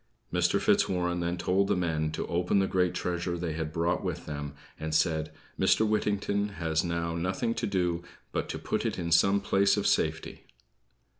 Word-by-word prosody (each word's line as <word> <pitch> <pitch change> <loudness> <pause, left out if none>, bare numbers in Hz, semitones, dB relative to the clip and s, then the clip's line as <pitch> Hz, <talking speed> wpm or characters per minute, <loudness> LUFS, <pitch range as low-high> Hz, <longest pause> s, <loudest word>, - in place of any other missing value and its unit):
Mr. - - +2
Fitzwarren 90 -1 +2
then 85 +1 -1
told 95 +3 +1
the - - +2
men 80 -3 0
to 80 - -3
open 90 +3 0
the 95 - +3
great 90 -2 +1
treasure 85 0 -2
they 85 -2 -3
had 80 -1 -3
brought 85 +2 0
with 90 -2 -4
them, 75 -1 -5 0.2
and 80 0 -2
said, 80 -1 +1 0.3
"Mr. 110 - +4
Whittington 100 -1 0
has 80 -1 0
now 85 -1 -2
nothing 95 +7 -1
to - - -2
do 90 -3 0 0.3
but - - -2
to - - -3
put - - -2
it - - -2
in 85 -1 -3
some 95 +5 +5
place 100 0 +2
of 105 - -1
safety." - - 0
90 Hz, 180 wpm, -29 LUFS, 85-95 Hz, 0.3 s, some